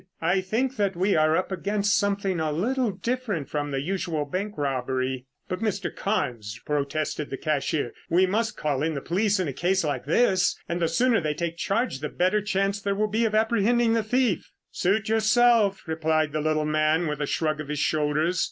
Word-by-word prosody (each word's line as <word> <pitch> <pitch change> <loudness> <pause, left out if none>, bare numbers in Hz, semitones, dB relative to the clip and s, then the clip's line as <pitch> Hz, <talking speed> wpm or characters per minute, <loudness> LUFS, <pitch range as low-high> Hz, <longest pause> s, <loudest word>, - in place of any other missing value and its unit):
"I 175 +4 +1
think 240 +8 -1
that 200 -3 0
we 190 +3 +2
are 155 +1 +3
up 185 - -2
against 200 +2 0
something 200 -3 0
a 155 -1 0
little 240 - 0
different 210 - -3
from 145 -1 -2
the 135 -1 -2
usual 170 -2 -2
bank 200 +8 -4
robbery." 130 -2 -2 0.2
"But, 185 - -3
Mr. 210 -3 -2
Carnes," 115 - -2
protested 150 +1 -2
the 135 - -4
cashier, 145 -4 -1 0.2
"we 180 +3 +4
must 220 +5 -1
call 145 -3 -1
in 160 +1 0
the 140 - -3
police 200 +5 +1
in 185 - 0
a 140 - -3
case 185 +6 +1
like 145 -5 -2
this, 190 - +2
and 170 +1 -2
the 165 - +3
sooner 235 +7 +2
they 155 -2 -1
take 170 0 -3
charge 210 - -1
the 150 +1 -4
better 185 +4 +1
chance 195 0 0
there 200 0 -1
will 210 +1 0
be 225 +2 +1
of 215 -1 0
apprehending 225 +1 +3
the 230 - +2
thief." 235 -1 0 0.2
"Suit 215 +5 0
yourself," 225 -2 +3
replied 160 -2 0
the 155 0 -1
little 155 0 +1
man 155 +2 +2
with 150 -1 -3
a 145 - -1
shrug 155 0 -1
of 150 - -8
his 150 +1 -3
shoulders. 155 +4 +1
180 Hz, 200 wpm, -25 LUFS, 150-210 Hz, 0.2 s, we